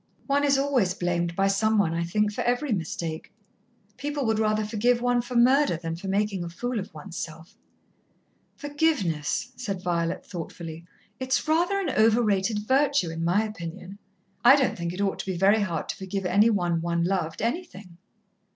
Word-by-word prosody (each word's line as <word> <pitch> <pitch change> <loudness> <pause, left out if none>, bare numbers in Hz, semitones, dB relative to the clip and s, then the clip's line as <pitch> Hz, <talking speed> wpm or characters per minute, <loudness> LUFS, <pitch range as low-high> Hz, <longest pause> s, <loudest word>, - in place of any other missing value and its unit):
"One 285 0 +1
is 280 -1 +3
always 260 -10 +1
blamed 175 -2 -1
by 195 +1 +2
some 215 +3 +2
one, 170 -6 +2
I 170 0 -1
think, 210 +5 0
for - - -2
every 245 +3 0
mistake. 165 -4 -3 0.7
People 290 -1 -3
would 220 -1 +1
rather 215 0 +1
forgive 235 +3 +1
one 245 0 +2
for 245 +1 -8
murder, 260 - +4
than 165 0 -4
for 180 +4 -8
making 200 -1 0
a 170 - -5
fool 245 +7 -3
of 190 - -7
oneself." 160 +1 -8 1.0
"Forgiveness," 255 - -1
said 195 -7 -5
Violet 170 -1 -1
thoughtfully. 165 -1 -8 0.3
"It's 260 +3 0
rather 345 +5 +2
an 355 -8 -1
overrated 215 -2 +2
virtue, 270 - +2
in 165 0 -4
my 180 +6 +2
opinion. 190 -1 -7 0.4
I 255 +3 +9
don't 275 -3 +1
think 170 -1 -3
it 180 +3 -5
ought 200 -1 0
to - - -4
be 185 -2 -2
very 200 +4 +4
hard 170 -6 -2
to - - -2
forgive 190 0 -4
any 205 +5 +4
one 175 -6 0
one 170 0 0
loved, 170 -3 -1
anything." 210 - -4
205 Hz, 175 wpm, -26 LUFS, 170-245 Hz, 1.0 s, I